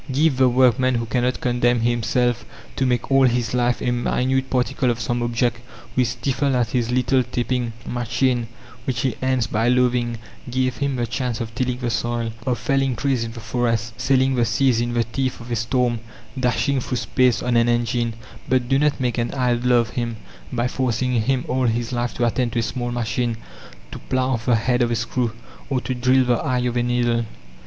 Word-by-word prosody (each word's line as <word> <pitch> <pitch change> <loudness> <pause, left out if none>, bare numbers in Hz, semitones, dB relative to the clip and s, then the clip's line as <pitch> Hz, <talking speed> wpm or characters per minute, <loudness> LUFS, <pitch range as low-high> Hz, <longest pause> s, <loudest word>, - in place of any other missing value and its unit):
Give 145 +2 +3
the 130 -1 +5
workman 130 0 +3
who 115 0 -1
cannot 125 +1 0
condemn 120 -1 +2
himself 120 +1 +1 0.3
to 130 - +1
make 125 +1 -1
all 135 -1 +6
his 120 -2 0
life 120 -1 +1
a 125 - +1
minute 130 +2 0
particle 125 0 +1
of 120 -1 -1
some 120 +1 -1
object, 120 0 0 0.4
who 130 - +2
is 120 - +1
stifled 135 +3 0
at 120 -2 0
his 120 -3 0
little 130 +1 +2
tapping 125 -1 -2
machine, 120 0 0 0.4
which 130 - -1
he 130 -3 0
ends 130 -2 +1
by 110 +2 0
loathing, 125 -1 +2 0.3
give 130 0 0
him 140 -1 -1
the 120 -1 -1
chance 120 0 -2
of 115 -2 -5
tilling 125 0 -1
the 120 -2 -2
soil, 120 0 -1 0.2
of 125 -2 +1
felling 135 -2 0
trees 135 -3 0
in 115 0 -6
the 115 - -8
forest, 115 0 -1
sailing 130 +1 +2
the 120 -2 +2
seas 115 +1 +2
in 120 0 -2
the 120 - +3
teeth 130 +3 -3
of 120 0 -9
a - - +1
storm, 120 +1 0 0.4
dashing 130 +2 +1
through 125 - -3
space 125 -1 +2
on 125 -1 +1
an 115 0 +4
engine, 120 -1 0 0.3
but 130 -1 +2
do 135 +1 +3
not 150 0 +1
make 125 -1 0
an 120 - -1
idler 125 -1 +2
of 115 -2 +2
him 115 -2 -3 0.3
by 120 0 0
forcing 125 -1 0
him 130 +2 0
all 130 0 +1
his 115 +2 -1
life 120 0 -2
to 120 - +1
attend 120 0 0
to - - -2
a 115 - +2
small 120 +1 -3
machine, 120 0 -1 0.5
to - - -7
plough 130 -1 0
the 120 0 +3
head 120 +3 +1
of 120 - +2
a 120 - 0
screw, 115 +1 -1 0.4
or 135 -2 +1
to 130 - -3
drill 130 +1 +3
the 120 -1 +2
eye 125 -2 0
of 125 -1 -1
a 120 - +2
needle. 120 -1 +1
120 Hz, 205 wpm, -22 LUFS, 120-130 Hz, 0.5 s, all